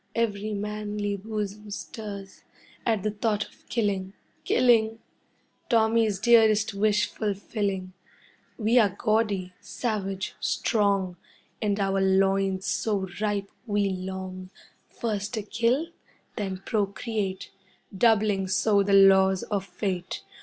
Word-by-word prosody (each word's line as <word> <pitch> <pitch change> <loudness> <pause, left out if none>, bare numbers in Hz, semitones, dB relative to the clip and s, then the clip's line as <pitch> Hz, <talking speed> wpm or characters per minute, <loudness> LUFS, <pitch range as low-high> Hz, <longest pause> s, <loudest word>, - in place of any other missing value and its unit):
Every 215 -2 -1
manly 210 0 -3
bosom 210 0 -5
stirs 200 -1 -7 0.5
At 220 -4 +1
the 215 - 0
thought 210 0 -1
of - - -24
killing 195 -4 -1 0.3
killing! 225 -3 +4 0.7
Tommy's 225 -3 +3
dearest 220 -1 +4
wish 210 +1 +2
fulfilling. 200 -2 -3 0.6
We 230 +2 +4
are 205 -5 +3
gaudy, 210 -5 0
savage, 195 -5 -3
strong, 200 -5 +1 0.4
And 205 -2 0
our 195 -1 +1
loins 195 0 +2
so 200 -4 0
ripe 205 -2 -1 0.2
we 205 -2 +1
long 185 0 -6 0.4
First 215 -1 -3
to 215 - -3
kill, 235 +9 0 0.5
then 195 -4 -4
procreate, 205 -2 -2 0.4
Doubling 210 -2 +3
so 200 +2 +3
the 200 0 +1
laws 190 -1 +6
of 200 -2 -2
Fate. 180 -1 -4
205 Hz, 110 wpm, -26 LUFS, 195-220 Hz, 0.7 s, laws